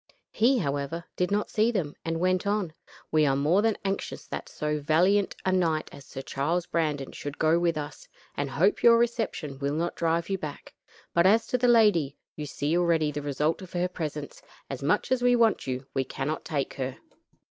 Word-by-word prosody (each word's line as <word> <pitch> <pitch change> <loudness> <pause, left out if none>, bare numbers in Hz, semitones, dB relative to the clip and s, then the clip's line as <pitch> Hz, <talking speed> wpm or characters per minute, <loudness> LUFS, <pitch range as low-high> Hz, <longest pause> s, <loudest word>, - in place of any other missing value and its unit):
He, 250 +5 +3
however, 145 - -2
did 180 - 0
not 205 +1 -1
see 220 +2 +3
them, 170 -10 -2
and 165 0 -2
went 185 +2 +1
on: 200 -5 0 0.4
"We 155 -1 +4
are 135 - +2
more 155 +8 +3
than 225 -1 +1
anxious 195 0 -3
that - - -6
so 150 0 -2
valiant 180 +7 +2
a 190 - +2
knight 165 -4 +1
as 140 - -12
Sir 135 - -7
Charles 165 +7 -1
Brandon 150 -5 -1
should 145 +1 -7
go 160 +2 +3
with 170 -2 +1
us, 145 -1 -6 0.3
and 145 -1 -2
hope 170 +9 +2
your 230 -1 +7
reception 225 - -1
will 140 +1 -1
not 170 +2 -1
drive 165 0 0
you 195 -1 -2
back, 150 -3 -7 0.4
but 170 +2 +5
as 220 +3 +4
to 250 - 0
the 245 - +3
lady 205 - +4 0.2
you 150 -1 -5
see 145 +3 -1
already 165 -3 +2
the 145 0 -4
result 145 +4 -1
of 185 - -11
her 175 0 +1
presence, 155 -5 -6 0.3
and 135 - -5
much 165 - +1
as 260 -1 +2
we 245 0 +4
want 230 - +2
you, 130 +1 -3
we 135 - +1
cannot 135 +4 -4
take 140 -4 -2
her. 130 -1 -4
165 Hz, 200 wpm, -27 LUFS, 145-195 Hz, 0.4 s, your